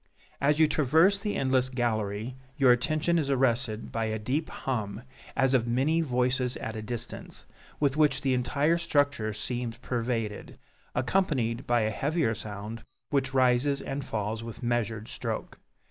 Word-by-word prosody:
As 145 Hz, +2 st, +3 dB
you 160 Hz, -1 st, +6 dB
traverse 160 Hz, +7 st, +4 dB
the 210 Hz, 0 st, -2 dB
endless 130 Hz, -1 st, +2 dB
gallery, 115 Hz, -2 st, -1 dB, 0.2 s
your 135 Hz, -4 st, +6 dB
attention 155 Hz, +7 st, +2 dB
is 145 Hz, -3 st, -1 dB
arrested 125 Hz, -4 st, +1 dB
by 115 Hz, -1 st, -1 dB
a 110 Hz, 0 st, -1 dB
deep 135 Hz, +9 st, -1 dB
hum, 110 Hz, -4 st, -3 dB, 0.3 s
as 135 Hz, -1 st, +3 dB
of 120 Hz, -3 st, +3 dB
many 135 Hz, +8 st, +2 dB
voices 125 Hz, -2 st, +1 dB
at 110 Hz, -, -5 dB
a 110 Hz, -, -4 dB
distance, 115 Hz, +1 st, -5 dB, 0.3 s
with 145 Hz, -1 st, +1 dB
which 150 Hz, -1 st, +3 dB
the 135 Hz, -1 st, +1 dB
entire 140 Hz, +7 st, +2 dB
structure 145 Hz, -9 st, +1 dB
seems 120 Hz, +2 st, -4 dB
pervaded, 115 Hz, -4 st, -3 dB, 0.4 s
accompanied 125 Hz, -4 st, 0 dB
by 120 Hz, -1 st, +3 dB
a 110 Hz, 0 st, +1 dB
heavier 145 Hz, +1 st, 0 dB
sound, 105 Hz, +1 st, -7 dB, 0.3 s
which 135 Hz, -2 st, 0 dB
rises 130 Hz, +2 st, +3 dB
and 135 Hz, +1 st, -4 dB
falls 110 Hz, -1 st, -3 dB
with 115 Hz, +1 st, -8 dB
measured 115 Hz, -2 st, -1 dB
stroke. -, -, -4 dB
125 Hz, 150 wpm, -28 LUFS, 115-140 Hz, 0.4 s, you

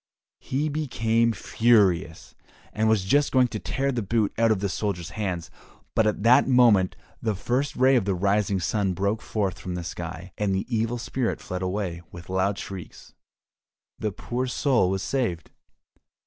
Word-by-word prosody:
He 145 Hz, +4 st, -2 dB
became 115 Hz, -6 st, +1 dB
furious, 100 Hz, -6 st, +1 dB, 0.4 s
and 110 Hz, +1 st, +1 dB
was 110 Hz, -4 st, +3 dB
just 145 Hz, +9 st, +2 dB
going 130 Hz, -2 st, +4 dB
to 110 Hz, -, -4 dB
tear 135 Hz, +5 st, -1 dB
the 120 Hz, -3 st, -2 dB
boot 105 Hz, 0 st, 0 dB
out 115 Hz, 0 st, +3 dB
of 110 Hz, -3 st, +2 dB
the 100 Hz, -, -1 dB
soldier's 90 Hz, -4 st, -3 dB
hands, 90 Hz, -6 st, -4 dB, 0.4 s
but 110 Hz, -, +3 dB
at 105 Hz, -1 st, -1 dB
that 120 Hz, +2 st, +6 dB
moment 120 Hz, -8 st, +4 dB, 0.3 s
the 110 Hz, -3 st, 0 dB
first 125 Hz, +8 st, -1 dB
ray 130 Hz, +1 st, +4 dB
of 115 Hz, -6 st, +2 dB
the 100 Hz, -2 st, 0 dB
rising 100 Hz, +1 st, +1 dB
sun 95 Hz, +2 st, 0 dB
broke 100 Hz, +5 st, -1 dB
forth 100 Hz, -5 st, -2 dB
from 90 Hz, -1 st, -5 dB
the 90 Hz, -, -4 dB
sky, 85 Hz, +2 st, -7 dB
and 100 Hz, -2 st, +1 dB
the 95 Hz, -, -1 dB
Evil 115 Hz, +2 st, 0 dB
Spirit 120 Hz, +1 st, -2 dB
fled 90 Hz, -2 st, -5 dB
away 90 Hz, -2 st, -3 dB
with 85 Hz, 0 st, -11 dB
loud 95 Hz, +2 st, +1 dB
shrieks. 95 Hz, -3 st, -9 dB, 0.9 s
The 110 Hz, -, -1 dB
poor 125 Hz, +6 st, -3 dB
soul 125 Hz, -6 st, +2 dB
was 95 Hz, 0 st, -1 dB
saved. 110 Hz, -12 st, -2 dB
105 Hz, 170 wpm, -25 LUFS, 95-120 Hz, 0.9 s, that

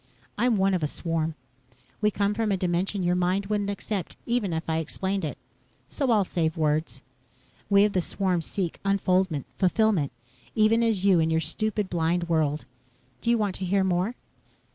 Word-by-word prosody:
I'm 240 Hz, -2 st, +2 dB
one 195 Hz, 0 st, +2 dB
of 180 Hz, -, 0 dB
a 150 Hz, -, +1 dB
swarm. 165 Hz, 0 st, -2 dB, 0.7 s
We 210 Hz, -, +4 dB
come 200 Hz, 0 st, 0 dB
from 220 Hz, -1 st, 0 dB
a 195 Hz, -, +2 dB
dimension 185 Hz, +2 st, -1 dB
your 175 Hz, 0 st, +2 dB
mind 180 Hz, +2 st, +1 dB
wouldn't 205 Hz, 0 st, -1 dB
accept 200 Hz, -1 st, -3 dB
even 235 Hz, -6 st, 0 dB
if 160 Hz, 0 st, -3 dB
I 160 Hz, 0 st, 0 dB
explained 190 Hz, +4 st, -2 dB
it, 150 Hz, -, -3 dB, 0.5 s
so 275 Hz, -4 st, -1 dB
I'll 215 Hz, -4 st, +4 dB
save 160 Hz, -3 st, -1 dB
words. 155 Hz, 0 st, 0 dB, 0.7 s
We 200 Hz, 0 st, +6 dB
of 210 Hz, -, -1 dB
the 185 Hz, -, +2 dB
swarm 185 Hz, -1 st, 0 dB
seek 175 Hz, +1 st, -3 dB
unfoldment 185 Hz, -6 st, +1 dB
fulfillment 190 Hz, -5 st, +2 dB, 0.4 s
even 220 Hz, +1 st, +4 dB
as 220 Hz, -5 st, +1 dB
you 190 Hz, -4 st, +5 dB
in 160 Hz, 0 st, +2 dB
your 160 Hz, 0 st, +2 dB
stupid, 215 Hz, +3 st, -1 dB
blind 170 Hz, 0 st, 0 dB
world. 155 Hz, -3 st, 0 dB, 0.6 s
Do 235 Hz, -, -1 dB
you 235 Hz, -, +4 dB
want 205 Hz, -3 st, 0 dB
to 190 Hz, -, -3 dB
hear 195 Hz, +2 st, +2 dB
more?" 190 Hz, +5 st, 0 dB
190 Hz, 180 wpm, -26 LUFS, 165-205 Hz, 0.7 s, We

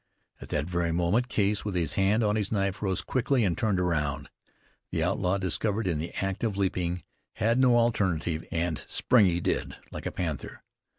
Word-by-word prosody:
At -, -, -9 dB
that 75 Hz, -1 st, -1 dB
very 85 Hz, -1 st, -1 dB
moment 90 Hz, +9 st, +1 dB
Case, 105 Hz, -3 st, +1 dB
with 105 Hz, -3 st, -3 dB
his 80 Hz, -4 st, 0 dB
hand 100 Hz, +4 st, +2 dB
on 105 Hz, 0 st, +2 dB
his 105 Hz, -2 st, -1 dB
knife, 100 Hz, -1 st, 0 dB
rose 95 Hz, -3 st, +1 dB
quickly 130 Hz, -2 st, +1 dB
and 90 Hz, -4 st, +1 dB
turned 105 Hz, 0 st, +1 dB
round. 75 Hz, -5 st, -1 dB, 0.6 s
The -, -, -1 dB
outlaw, 90 Hz, +2 st, +1 dB
discovered 100 Hz, +3 st, -1 dB
in 85 Hz, -5 st, 0 dB
the 85 Hz, +2 st, -4 dB
act 95 Hz, +2 st, -3 dB
of 105 Hz, -4 st, 0 dB
leaping, 90 Hz, -2 st, -1 dB, 0.3 s
had 115 Hz, +3 st, +1 dB
no 125 Hz, -2 st, +5 dB
alternative, 90 Hz, -9 st, +1 dB
and 85 Hz, -2 st, -1 dB
spring 120 Hz, -6 st, +4 dB
he 85 Hz, -1 st, +1 dB
did, -, -, -1 dB, 0.2 s
like -, -, -5 dB
a -, -, -3 dB
panther. 80 Hz, -7 st, -4 dB
95 Hz, 185 wpm, -28 LUFS, 85-105 Hz, 0.6 s, no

